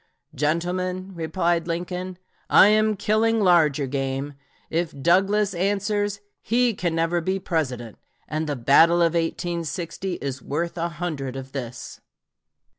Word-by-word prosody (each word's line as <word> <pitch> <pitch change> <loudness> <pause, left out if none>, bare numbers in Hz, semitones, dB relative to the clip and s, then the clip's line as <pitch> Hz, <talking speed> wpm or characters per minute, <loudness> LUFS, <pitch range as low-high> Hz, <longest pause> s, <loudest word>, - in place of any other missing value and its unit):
"Gentlemen," 180 +5 -1
replied 170 0 -1
Lincoln, 180 +2 -4 0.3
"I 200 - +7
am 215 0 +3
killing 220 +3 +2
larger 160 -7 +4
game; 135 +1 -3 0.4
if 165 -3 -2
Douglas 195 +6 +3
answers, 205 +2 -1 0.2
he 240 +1 +2
can 175 -4 -2
never 165 +1 +1
be 190 +3 -1
President, 130 - -3 0.3
and 155 +1 -2
the 145 - -1
battle 165 +7 +5
of 165 -1 +2
1860 170 +2 -3
is 140 -5 -5
worth 170 +7 -3
a 170 0 -2
hundred 150 -6 -4
of 135 0 -7
this." 125 -3 -7
170 Hz, 125 wpm, -24 LUFS, 150-190 Hz, 0.4 s, I